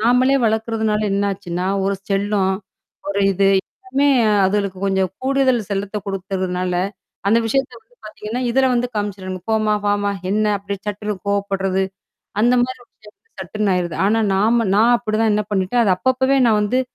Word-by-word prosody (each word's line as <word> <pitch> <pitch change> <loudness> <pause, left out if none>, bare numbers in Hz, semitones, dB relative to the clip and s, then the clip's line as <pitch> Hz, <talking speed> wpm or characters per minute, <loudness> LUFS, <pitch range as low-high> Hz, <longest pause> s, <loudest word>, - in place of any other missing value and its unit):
நாமளே 250 +4 +3
வளக்கறதுனால 220 -1 0
என்னாச்சுன்னா? 195 -3 -2 0.2
ஒரு 200 - +1
செல்லம், 200 -1 +1 0.6
ஒரு 200 0 -1
இது 195 +1 +2
எல்லாமே 265 +7 -2 0.4
அதுங்களுக்கு 195 -1 0
கொஞ்சம் 190 -2 +1
கூடுதல் 265 -2 +2
செல்லத்த 200 +1 -3
கொடுத்துர்றதுனால, 185 -1 -2 0.6
அந்த 225 - +4
விஷயத்தை 260 +2 -1
வந்து 235 +2 -32
பாத்திங்கன்னா, 215 +3 -5
இதில 260 +1 +3
வந்து 245 +1 0
காமிச்சிருவாங்க. 190 -3 -4
"போம்மா! 215 -1 +2
வாம்மா! 205 0 +1 0.2
என்னா?"அப்படியே 200 -1 0
சட்டுன்னு 210 +1 -3
கோவப்படுறது, 195 -1 0 0.6
அந்த 245 +1 +4
மாதிரி 255 0 -7
விஷயம் 210 -1 -19
வந்து 450 - -39
சட்டுன்னு 210 -2 -1
ஆயிருது. 175 -3 -2
ஆனா, 225 +2 +2
நாம் 220 +5 +3 0.2
நான் 235 +3 +5
அப்படிதான் 215 0 0
என்னா 210 -1 -1
பண்ணிட்டேன், 195 +5 +1
அது 190 - +3
அப்பப்பவே 260 +3 +2
நான் 215 -1 +3
வந்து 250 +5 +1
210 Hz, 145 wpm, -20 LUFS, 195-235 Hz, 0.6 s, நான்